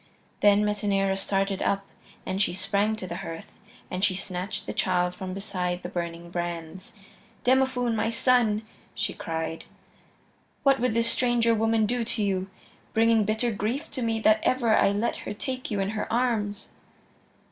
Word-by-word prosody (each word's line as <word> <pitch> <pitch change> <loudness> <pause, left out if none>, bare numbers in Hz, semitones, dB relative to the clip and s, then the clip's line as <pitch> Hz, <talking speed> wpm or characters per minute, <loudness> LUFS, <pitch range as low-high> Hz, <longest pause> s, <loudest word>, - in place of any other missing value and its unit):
Then 205 0 +5
Metaneira 200 -2 +1
started 195 0 0
up, 195 0 0 0.4
and 190 +1 -1
she 190 - +1
sprang 200 +3 +1
to 205 - -6
the 175 -1 -5
hearth, 165 -1 -7 0.4
and 185 +1 -2
she 200 -3 +3
snatched 185 0 -4
the - - -4
child 180 -1 +1
from 185 0 -6
beside 180 -3 -3
the 175 - -4
burning 170 -1 -5
brands. 175 +2 -5 0.5
"Demophoön, 255 -2 +3
my 225 0 +1
son," 230 -3 +3 0.3
she 210 - -2
cried, 160 0 -4 1.0
"what 275 -1 +4
would 245 -2 +1
this 230 0 +3
stranger 240 -2 +3
woman 225 0 +2
do 240 +2 0
to 225 -1 -2
you, 190 -1 -1 0.5
bringing 225 -1 +4
bitter 220 +3 +1
grief 230 +9 -3
to 260 - -3
me 225 -1 0
that 215 0 +5
ever 240 -4 +3
I - - +4
let 205 +4 0
her - - -5
take 255 +4 -4
you 205 - -1
in 195 +1 0
her 215 -1 -3
arms?" 225 -4 0
210 Hz, 165 wpm, -27 LUFS, 190-230 Hz, 1.0 s, Then